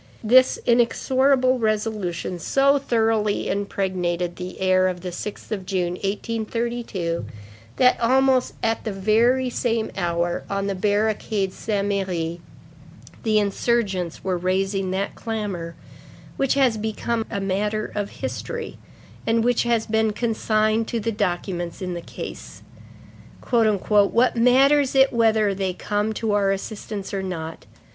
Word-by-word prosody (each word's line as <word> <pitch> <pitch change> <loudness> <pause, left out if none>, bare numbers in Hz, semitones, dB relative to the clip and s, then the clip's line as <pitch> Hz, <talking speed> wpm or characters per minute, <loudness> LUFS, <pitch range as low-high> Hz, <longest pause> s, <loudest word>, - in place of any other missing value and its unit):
This 255 +4 +5
inexorable 255 +2 +3
resolution 210 -5 -2
so 275 +9 +3
thoroughly 225 -5 +1
impregnated 180 -3 -1
the 180 +1 -7
air 185 0 +3
of 180 -1 -3
the 180 - -4
6th 205 +6 -7
of 200 -3 -2
June, 185 -2 -1
1832, 220 -2 -3 0.5
that, 250 0 +4
almost 260 +1 +3
at 225 0 0
the 220 - -3
very 225 +6 +2
same 230 -2 -1
hour, 175 -1 -1
on 200 0 -1
the 200 - -1
barricade 205 0 0
Saint 205 -2 -2
Merry, 175 -4 -2 0.8
the 215 -1 +2
insurgents 200 -4 0
were 185 -2 -1
raising 190 +1 0
that 195 +2 -2
clamor 200 -7 -4 0.6
which 275 -1 +1
has 260 -5 +3
become 220 +1 -2
a 200 - -3
matter 210 +2 -1
of 205 -1 -2
history 475 -1 -5 0.5
and 225 0 +2
which 245 0 +2
has 235 -2 +1
been 220 -1 +1
consigned 215 0 +1
to 235 - -2
the 230 +1 -1
documents 175 -4 -2
in 180 -1 -4
the 170 - -5
case:—"What 215 +4 -1
matters 270 +4 +4
it 265 0 +5
whether 220 -3 +3
they 190 -1 -2
come 210 +3 -1
to 220 0 -2
our 200 -1 +2
assistance 200 0 -5
or 195 - -1
not? 165 -4 -6
210 Hz, 130 wpm, -23 LUFS, 190-230 Hz, 0.8 s, This